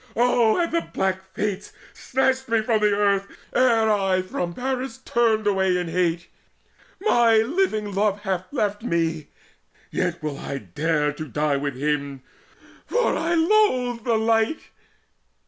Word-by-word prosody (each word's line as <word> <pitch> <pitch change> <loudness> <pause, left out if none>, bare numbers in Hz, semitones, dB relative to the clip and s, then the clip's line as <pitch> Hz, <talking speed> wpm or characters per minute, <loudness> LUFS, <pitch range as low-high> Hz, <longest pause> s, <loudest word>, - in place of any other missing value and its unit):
Oh 235 -2 +3
had 340 -1 0
the 335 0 +1
black 190 -7 -2
Fates 205 -3 -3 0.2
snatched 265 0 -1
me 225 -1 +2
from 220 -1 +1
the 210 0 +3
earth 200 -1 +1 0.3
Ere 235 -3 +3
I 195 -3 +1
from 175 -2 -4
Paris 260 -1 -3
turned 230 -4 +1
away 190 -2 +2
in 175 -2 -3
hate! 170 0 0 0.7
My 240 - +4
living 220 - 0
love 205 +1 0
hath 185 -2 -3
left 210 -6 -1
me! 165 -7 -1 0.6
yet - - -2
will 150 -2 -4
I 140 - -5
Dare 150 - -1
to 155 +1 -7
die 150 +2 0
with 140 -1 -3
him, 140 -1 -2 0.6
for 485 0 +1
I 340 +1 0
loathe 320 - +2
the 230 -2 +1
light." 225 +6 0
210 Hz, 145 wpm, -23 LUFS, 170-245 Hz, 0.7 s, My